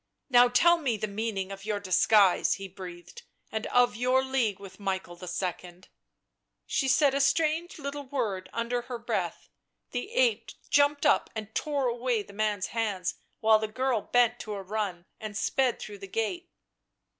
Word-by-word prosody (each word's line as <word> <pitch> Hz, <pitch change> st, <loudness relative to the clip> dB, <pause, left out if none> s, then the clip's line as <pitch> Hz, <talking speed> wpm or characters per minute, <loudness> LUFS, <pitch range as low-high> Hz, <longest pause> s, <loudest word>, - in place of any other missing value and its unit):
"Now 245 Hz, 0 st, +7 dB
tell 340 Hz, +8 st, +4 dB
me 250 Hz, -8 st, 0 dB
the 215 Hz, -, -2 dB
meaning 200 Hz, -2 st, -3 dB
of 195 Hz, 0 st, -8 dB
your 210 Hz, -1 st, -2 dB
disguise," 200 Hz, 0 st, +4 dB
he 195 Hz, 0 st, -7 dB
breathed 185 Hz, -, -10 dB
— -, -, -47 dB
" -, -, -40 dB
and 220 Hz, 0 st, -3 dB
of 245 Hz, -3 st, +3 dB
your 255 Hz, +3 st, +2 dB
league 250 Hz, -7 st, 0 dB
with 195 Hz, 0 st, -12 dB
Michael 190 Hz, -3 st, -3 dB
II." 180 Hz, 0 st, -5 dB, 0.8 s
She 270 Hz, -, 0 dB
said 275 Hz, +1 st, +4 dB
a 280 Hz, -, +1 dB
strange 315 Hz, +5 st, +1 dB
little 285 Hz, -1 st, -5 dB
word 220 Hz, -9 st, -2 dB
underneath 240 Hz, +1 st, -2 dB
her 245 Hz, -, -4 dB
breath; 230 Hz, -, -3 dB, 0.4 s
the 245 Hz, -, -4 dB
ape -, -, +1 dB, 0.2 s
jumped 285 Hz, 0 st, +3 dB
up -, -, +3 dB
and 220 Hz, -1 st, -6 dB
tore 285 Hz, -3 st, -1 dB
away 240 Hz, -2 st, 0 dB
the 200 Hz, -, -15 dB
man's 210 Hz, -2 st, -1 dB
hands 210 Hz, -5 st, -1 dB, 0.2 s
while 220 Hz, 0 st, +5 dB
the 220 Hz, -, -2 dB
girl 250 Hz, +1 st, 0 dB
bent 245 Hz, +1 st, +2 dB
to 210 Hz, -1 st, -5 dB
a 195 Hz, -, -6 dB
run 190 Hz, -3 st, -3 dB
and 215 Hz, -2 st, -6 dB
sped 255 Hz, +2 st, +1 dB
through 205 Hz, -1 st, -8 dB
the 195 Hz, -, -8 dB
gate. 225 Hz, -, -3 dB
225 Hz, 175 wpm, -28 LUFS, 200-265 Hz, 0.8 s, Now